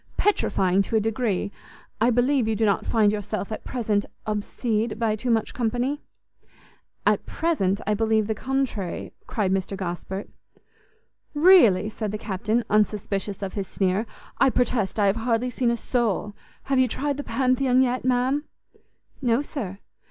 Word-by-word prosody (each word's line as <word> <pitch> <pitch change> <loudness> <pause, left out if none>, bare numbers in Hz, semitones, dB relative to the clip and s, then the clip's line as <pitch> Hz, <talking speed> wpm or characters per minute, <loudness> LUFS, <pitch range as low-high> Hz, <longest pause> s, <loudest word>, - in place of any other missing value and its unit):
petrifying 195 - +2
to 210 - -2
a - - +5
degree! 215 -2 -1 0.5
I 235 - +5
believe 245 +1 +2
you 220 - +1
do 220 +1 +1
not 200 -3 +1
find 215 -3 +3
yourself 210 0 -4
at 215 - -5
present 215 -5 0 0.2
obsede 215 +1 -1
by 225 -1 +1
too 235 +4 -4
much 225 -2 +1
company?" 245 +4 -1 1.0
"At - - +2
present, 215 - 0
I 210 - +1
believe 220 0 +2
the 220 - -1
contrary!" 255 -6 -3
cried 200 -4 0
Mr 195 +1 -1
Gosport. 190 +1 -4 1.1
"Really!" 290 - +6
said 215 -1 -4
the 215 - -3
Captain, 215 +3 -1
unsuspicious 205 -1 0
of 190 - -4
his 195 -2 -3
sneer, 195 +3 0 0.3
"I 270 - +5
protest 240 -5 0
I 205 - +4
have 200 +2 +2
hardly 235 +1 0
seen 245 0 +1
a 235 - +1
soul. 215 -4 -1 0.3
Have 270 -1 +1
you 260 - +4
tried 280 +4 -2
the 285 - -4
Pantheon 255 -1 +2
yet, 250 0 -1
ma'am?" 255 +4 +1 0.8
"No, 245 +1 +2
sir." 215 - -5
220 Hz, 155 wpm, -25 LUFS, 205-250 Hz, 1.1 s, Really